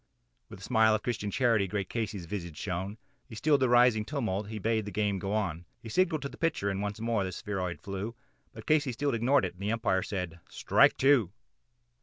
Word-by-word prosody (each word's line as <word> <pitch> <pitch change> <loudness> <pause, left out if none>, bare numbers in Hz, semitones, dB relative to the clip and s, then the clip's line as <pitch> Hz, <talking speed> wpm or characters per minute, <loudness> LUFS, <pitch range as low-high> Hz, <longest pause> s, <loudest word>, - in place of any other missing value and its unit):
With - - -10
a - - -12
smile 110 -1 +4
of 110 - -3
Christian 110 -4 -2
charity 115 -4 +2
great 100 0 -3
Casey's 110 -6 -3
visage 85 -4 -6
shone, 95 +2 -4 0.3
He 115 - -9
stilled 150 +4 +3
the 130 - +3
rising 120 -3 +5
tumult 110 -6 -2
and - - -9
he 110 - -4
bade 110 +1 0
the 105 - -6
game 105 -2 0
go 95 +2 -3
on; 90 -6 -1 0.2
He 115 - -10
signalled 160 +3 +1
to 140 - -3
the - - -14
pitcher 155 -12 0
and 95 +1 -3
again 105 +2 -4 0.2
the 95 - -3
spheroid 90 -1 -4
flew, 100 +4 -5 0.4
But - - -11
Casey 150 -4 +2
still 140 +3 -1
ignored 120 +1 +3
it 90 - -4
and 90 - -16
the 105 +2 -1
Umpire 115 -5 +1
said 90 -4 -4
"Strike - - +3
two." 130 -9 +4
105 Hz, 215 wpm, -30 LUFS, 95-120 Hz, 0.4 s, rising